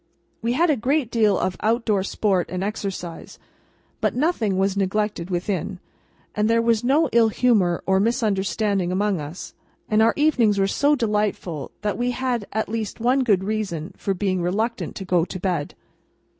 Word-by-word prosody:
We 235 Hz, +1 st, 0 dB
had 325 Hz, +5 st, +3 dB
a -, -, +3 dB
great 260 Hz, +1 st, 0 dB
deal 215 Hz, -4 st, +3 dB
of 185 Hz, 0 st, -1 dB
out 230 Hz, +2 st, +1 dB
door 205 Hz, -4 st, +2 dB
sport 190 Hz, -2 st, 0 dB
and 185 Hz, +1 st, -3 dB
exercise, 195 Hz, -5 st, -5 dB, 0.6 s
but -, -, 0 dB
nothing 245 Hz, -, +1 dB
was 195 Hz, 0 st, +1 dB
neglected 200 Hz, -2 st, -1 dB
within, 185 Hz, +1 st, -2 dB, 0.6 s
and 210 Hz, +1 st, +1 dB
there 230 Hz, 0 st, +4 dB
was 230 Hz, -1 st, +2 dB
no 290 Hz, +6 st, +3 dB
ill 230 Hz, -1 st, +4 dB
humour 205 Hz, -7 st, +2 dB
or 190 Hz, 0 st, +3 dB
misunderstanding 200 Hz, -3 st, 0 dB
among 195 Hz, -2 st, 0 dB
us, 150 Hz, +5 st, -8 dB, 0.3 s
and 215 Hz, 0 st, +3 dB
our 225 Hz, +1 st, +4 dB
evenings 250 Hz, -9 st, +3 dB
were 195 Hz, -, +3 dB
so 285 Hz, +9 st, +2 dB
delightful 210 Hz, -, -1 dB
that 210 Hz, 0 st, -1 dB
we 245 Hz, +1 st, +1 dB
had 245 Hz, -4 st, -2 dB
at 220 Hz, +1 st, -1 dB
least 220 Hz, 0 st, -4 dB
one 250 Hz, +4 st, +2 dB
good 200 Hz, -6 st, +2 dB
reason 195 Hz, -6 st, -3 dB
for 195 Hz, -, -2 dB
being 185 Hz, -1 st, -1 dB
reluctant 215 Hz, +7 st, -2 dB
to 195 Hz, -, -6 dB
go 180 Hz, -2 st, +2 dB
to 185 Hz, -, -6 dB
bed. 175 Hz, -5 st, -2 dB
210 Hz, 170 wpm, -23 LUFS, 190-230 Hz, 0.6 s, there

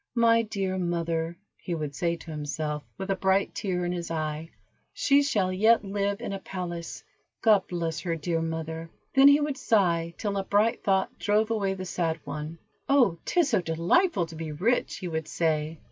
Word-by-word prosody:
"My 230 Hz, -1 st, +5 dB
dear 195 Hz, -4 st, -2 dB
mother," 170 Hz, -1 st, -1 dB, 0.2 s
he 175 Hz, -, -4 dB
would 150 Hz, -3 st, -4 dB
say 170 Hz, +2 st, 0 dB
to 165 Hz, -1 st, -10 dB
himself, 150 Hz, 0 st, -3 dB, 0.2 s
with 190 Hz, +1 st, -3 dB
a -, -, +2 dB
bright 190 Hz, +1 st, +1 dB
tear 180 Hz, -3 st, -2 dB
in 175 Hz, -, -1 dB
his 175 Hz, -1 st, -4 dB
eye, 155 Hz, 0 st, -3 dB, 0.4 s
"she 280 Hz, 0 st, +4 dB
shall 200 Hz, -10 st, +1 dB
yet 220 Hz, +3 st, +4 dB
live 200 Hz, +1 st, -1 dB
in 220 Hz, -, -4 dB
a 195 Hz, -, -4 dB
palace. 175 Hz, -3 st, -6 dB, 0.4 s
God 210 Hz, -4 st, +5 dB
bless 165 Hz, -2 st, -2 dB
her, 170 Hz, -3 st, -2 dB
dear 165 Hz, +1 st, -1 dB
mother." 160 Hz, 0 st, -4 dB, 0.2 s
Then 270 Hz, 0 st, +7 dB
he 285 Hz, +1 st, +7 dB
would 295 Hz, -2 st, -1 dB
sigh 170 Hz, -8 st, +1 dB
till 205 Hz, -2 st, -2 dB
a 195 Hz, -, 0 dB
bright 210 Hz, +4 st, +1 dB
thought 190 Hz, -1 st, +1 dB
drove 215 Hz, +2 st, +2 dB
away 200 Hz, -3 st, 0 dB
the 185 Hz, 0 st, -6 dB
sad 165 Hz, -3 st, -1 dB
one. 150 Hz, +3 st, -6 dB, 0.3 s
"Oh, 245 Hz, -12 st, +4 dB
'tis 345 Hz, -5 st, +2 dB
so 215 Hz, -7 st, +2 dB
delightful 175 Hz, -, +2 dB
to 165 Hz, 0 st, -11 dB
be 160 Hz, -1 st, -5 dB
rich," 205 Hz, +12 st, 0 dB
he 185 Hz, -, -5 dB
would 160 Hz, -2 st, -3 dB
say. 160 Hz, -1 st, -1 dB
180 Hz, 190 wpm, -27 LUFS, 165-205 Hz, 0.4 s, Then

